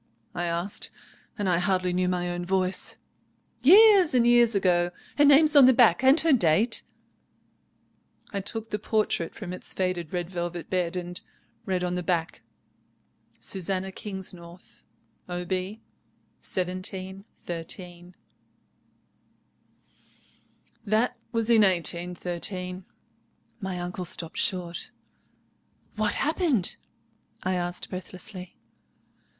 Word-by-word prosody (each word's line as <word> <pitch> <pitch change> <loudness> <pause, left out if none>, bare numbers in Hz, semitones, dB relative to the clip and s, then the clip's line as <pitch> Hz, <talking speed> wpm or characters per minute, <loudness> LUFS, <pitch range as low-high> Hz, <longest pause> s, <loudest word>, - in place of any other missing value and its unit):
I 175 - -2
asked, 170 +3 -1 0.5
and 205 -3 -1
I 175 -2 +3
hardly 185 -1 +1
knew 180 0 +1
my 180 -1 -1
own 175 0 -3
voice. 185 +1 -1 0.6
"'Years 385 - +7
and 240 -1 +4
years 240 -2 +5
ago! 175 -3 +2 0.3
Her 290 - +7
name's 295 +2 +6
on 280 -2 +9
the 260 - +7
back 235 -3 +5
and 270 +4 +7
her 325 -2 +4
date——' 210 +1 +3 1.5
"I 200 - -1
took 225 +3 -4
the 210 - -2
portrait 210 -6 -1
from 185 -4 -6
its 185 - -4
faded 180 -4 -2
red 175 -2 -2
velvet 175 -1 -5
bed, 180 -2 0
and 180 0 -5 0.5
read 185 -2 0
on 180 0 -1
the 180 - -2
back—'Susannah 185 +2 -5
Kingsnorth, 185 -3 -7 0.5
Ob. 180 +1 -5
1713.' 185 -2 -6 2.7
"That 220 +3 +1 0.2
was 230 -1 +1
in 225 -2 +6
1813." 180 0 -1 0.7
My 190 -4 -4
uncle 180 +1 -4
stopped 165 -1 -1
short. 175 -2 -1 1.1
"What 215 -1 0
happened?" 300 - 0 0.7
I 185 - 0
asked 175 -1 -3
breathlessly. 185 0 -8
185 Hz, 105 wpm, -26 LUFS, 175-215 Hz, 2.7 s, on